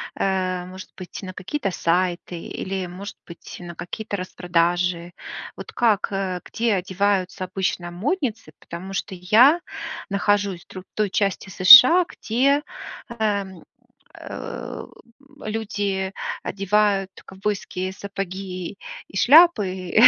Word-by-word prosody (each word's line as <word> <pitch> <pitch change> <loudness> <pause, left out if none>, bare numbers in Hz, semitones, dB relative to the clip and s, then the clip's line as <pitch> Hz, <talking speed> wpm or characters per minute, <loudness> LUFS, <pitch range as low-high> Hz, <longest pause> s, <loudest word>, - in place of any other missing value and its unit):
э, 185 -2 -1
может 185 +1 -10
быть, 185 +1 -8
на 185 -1 -7
какие-то 195 +3 -3
сайты 175 0 -1
или, 190 +1 -4
может 190 +4 -8
быть, 170 - -11
на 175 -1 -9
какие-то 205 +4 -5
распродажи. 175 -1 0 0.4
Вот - - -9
как, 220 -4 +2
э, 190 -2 -2
где 230 -2 0
одеваются 190 0 0
обычно 185 -2 -2
модницы, 230 - -2
потому 185 +3 -8
что 190 -1 -3
я 235 - +5 0.5
нахожусь 200 -2 0
в - - -64
др 185 -1 -8
той 210 -2 +1
части 195 -1 -1
США, 285 - +9
где, 275 +6 +1 0.6
эм, 200 -4 -1 0.5
э, - - -7 0.6
люди 205 -3 -2 0.3
одевают 200 -1 +1 0.2
ковбойские 190 -1 -3
сапоги 195 -1 -6 0.3
и 195 - -7
шляпы, 205 - +5
190 Hz, 110 wpm, -23 LUFS, 180-205 Hz, 0.6 s, США